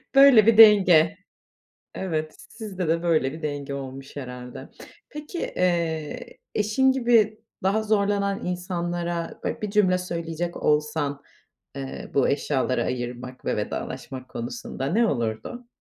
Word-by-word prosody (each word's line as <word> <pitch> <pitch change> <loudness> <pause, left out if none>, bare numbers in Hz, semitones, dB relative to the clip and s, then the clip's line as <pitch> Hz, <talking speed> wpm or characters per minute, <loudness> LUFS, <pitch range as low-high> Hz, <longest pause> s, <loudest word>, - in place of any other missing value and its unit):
Böyle 275 -6 +8
bir 230 -1 +5
denge. 190 -6 +7 0.8
Evet, 155 -4 -3
sizde 195 -6 -5
de 165 +1 +1
böyle 155 -5 +1
bir 160 - -9
denge 145 -2 -4
olmuş 135 0 -8
herhâlde. 125 -2 -8 0.4
Peki, 300 +4 -8
eee, 165 -4 -2 0.2
eşin 215 +6 +3
gibi 235 -4 +3 0.2
daha 200 +3 +1
zorlanan 200 -2 0
insanlara 175 -1 -3
böyle - - -3
bir 210 - -2
cümle 195 -3 +3
söyleyecek 170 -1 -4
olsan, 150 -1 0 0.6
eee, 135 -1 -6
bu 140 - +3
eşyaları 135 -2 0
ayırmak 125 0 -5
ve - - -1
vedalaşmak 130 -1 -5
konusunda, 135 - -5
ne 225 +10 +2
olurdu? 125 - -3
170 Hz, 120 wpm, -25 LUFS, 140-205 Hz, 0.8 s, Böyle